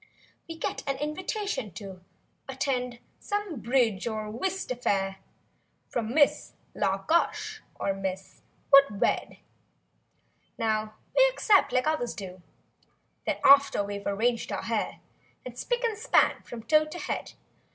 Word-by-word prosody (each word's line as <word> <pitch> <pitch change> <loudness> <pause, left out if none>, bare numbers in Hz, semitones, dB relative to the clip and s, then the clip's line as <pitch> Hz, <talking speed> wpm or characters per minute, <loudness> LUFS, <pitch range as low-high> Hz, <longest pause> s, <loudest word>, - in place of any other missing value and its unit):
We 330 - -6
get - - -3
an 275 -1 0
invitation 335 - -3
to 190 -3 -9 0.5
Attend 255 -2 -2 0.2
some 410 - -3
bridge 235 -5 +1
or 215 -2 -3
whist 380 - -3
affair. 195 -6 0 0.7
From 230 -2 -2
Miss 290 +1 +3 0.2
La 195 -2 +1
Gush 335 +8 0
or 195 - -1
Miss 190 -1 -5 0.3
Wouldwed. 275 -7 +4 1.2
Now 215 -1 -1 0.2
we - - +7
accept, 415 - +3
like 255 +2 +2
others 305 -7 -1
do; 185 -3 -8 0.9
Then - - +1
after 280 -6 +6
we've 200 0 -5
arranged 230 +4 0
our - - -3
hair. - - -2 0.4
And 250 - -7
spic 485 - -2
and 455 -2 +1
span 455 +4 +3
from 230 -2 -9
toe 305 +5 +4
to 305 +3 -8
head. - - -4
245 Hz, 130 wpm, -28 LUFS, 210-310 Hz, 1.2 s, we